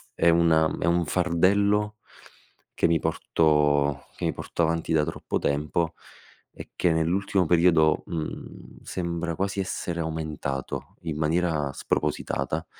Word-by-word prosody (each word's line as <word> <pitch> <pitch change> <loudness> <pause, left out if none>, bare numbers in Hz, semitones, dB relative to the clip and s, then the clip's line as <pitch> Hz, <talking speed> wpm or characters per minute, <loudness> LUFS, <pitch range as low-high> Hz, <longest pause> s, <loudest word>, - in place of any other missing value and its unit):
è 85 - +4
una 80 -1 +3
è - - -1
un 85 0 +2
fardello, 100 +5 +2 0.8
che - - +2
mi 80 -1 +2
porto 75 -3 +1
che - - -3
mi - - 0
porto 85 - -3
avanti 80 0 0
da 75 -1 +3
troppo 80 - -3
tempo 75 +3 0 0.6
e - - -10
che 90 - +2
nell'ultimo 90 +3 +1
periodo, 85 -2 +4
mhmm, 80 -2 -7
sembra 85 -2 -3
quasi 100 +2 -2
essere 85 -2 -3
aumentato 80 -4 -4
in 80 -3 -4
maniera 80 -2 0
spropositata 80 +2 -2
85 Hz, 125 wpm, -26 LUFS, 80-90 Hz, 0.8 s, è